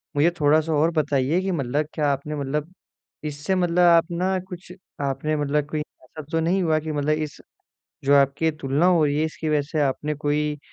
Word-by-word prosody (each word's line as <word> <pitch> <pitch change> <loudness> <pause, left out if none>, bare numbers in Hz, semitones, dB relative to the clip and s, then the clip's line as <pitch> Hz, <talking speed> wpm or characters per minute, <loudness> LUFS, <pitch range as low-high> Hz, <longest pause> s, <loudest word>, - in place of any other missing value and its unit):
मुझे 145 +4 +4
थोड़ा-सा 155 +2 +3
और 155 +3 +2
बताइए 145 +1 +1
कि 190 0 -2
मतलब 145 -2 -1
क्या 150 -2 0
आपने 140 +2 -3
मतलब 150 +4 -3 0.5
इससे 150 +5 -2
मतलब 175 -1 +1
आप 170 -1 +5
ना 185 +2 0
कुछ 180 -1 -9 0.3
आपने 140 +2 -1
मतलब 145 0 0
कोई 155 -1 -2
ऐसा 150 0 -11
तो 165 - +1
नहीं 175 +4 +1
हुआ 160 -2 +2
कि 155 0 -5
मतलब 145 0 -1
इस 155 -1 -5 0.7
जो 140 +1 +4
आपकी 140 +3 +2
तुलना 140 +4 +1
हो 175 -4 +4
रही 145 0 0
है 155 - +2
इसकी 160 0 -5
वजह 150 -1 +2
से 155 - 0
आपने 145 +2 -1
कोई 150 0 -1
150 Hz, 195 wpm, -23 LUFS, 145-165 Hz, 0.7 s, आप